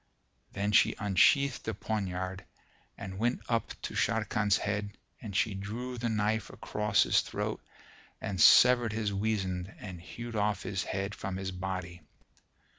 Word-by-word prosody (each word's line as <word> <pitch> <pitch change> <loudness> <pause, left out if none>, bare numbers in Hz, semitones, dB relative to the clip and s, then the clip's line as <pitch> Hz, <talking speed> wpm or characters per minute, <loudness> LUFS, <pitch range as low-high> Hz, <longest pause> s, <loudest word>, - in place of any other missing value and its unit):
Then 100 +1 -1
she - - +5
unsheathed 130 +7 +3
the 115 - -3
poniard 95 -3 -3 0.5
and 95 -1 -7
went 120 +2 0
up 115 -2 -1
to - - -4
Sharrkan's 105 -2 +1
head 105 0 -3 0.2
and 105 -5 -7
she 105 +1 +2
drew 115 +6 -5
the 120 0 -1
knife 110 -1 0
across 105 0 +1
his - - +3
throat - - -4 0.6
and 95 -4 -3
severed 120 -3 +7
his 105 -2 -1
weasand 95 -3 -1
and 90 -5 -8
hewed 120 +6 -8
off 105 -1 0
his 95 0 -2
head 100 +2 -3
from 95 -2 -5
his 95 0 -4
body. 90 -2 -5
105 Hz, 145 wpm, -30 LUFS, 95-110 Hz, 0.6 s, severed